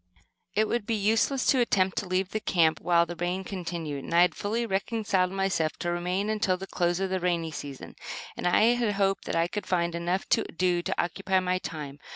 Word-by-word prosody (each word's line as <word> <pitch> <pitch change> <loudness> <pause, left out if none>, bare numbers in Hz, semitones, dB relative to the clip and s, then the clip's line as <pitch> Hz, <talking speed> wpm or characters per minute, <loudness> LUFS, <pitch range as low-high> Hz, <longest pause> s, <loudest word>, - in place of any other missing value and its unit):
It 215 +1 +3
would 225 -2 -2
be 230 - +1
useless 220 +6 +2
to 265 - +4
attempt 190 -6 +2
to 195 - -5
leave 185 +2 -1
camp 160 -4 +3
while 170 0 +3
the 175 +1 -6
rain 175 +2 -2
continued, 170 -7 -5
and 170 - -3
I 170 - +7
had 180 -2 +2
fully 225 +7 -2
reconciled 195 -2 0
myself 190 -5 0
to 175 - -2
remain 180 +3 -1
until 210 -4 +1
the 190 - -6
close 175 -2 0
of 190 -1 -1
the 190 - 0
rainy 170 -2 0
season; 140 -3 -8 0.4
and - - -2
I 220 +6 +5
hoped 200 -5 0
that - - -2
I 165 0 +2
could 205 +1 -5
find 170 -2 +1
enough 175 +3 -1
to - - +3
do 180 0 0
to - - -3
occupy 190 +2 0
the 185 0 0
time. 150 -5 -6
185 Hz, 205 wpm, -28 LUFS, 170-200 Hz, 0.4 s, I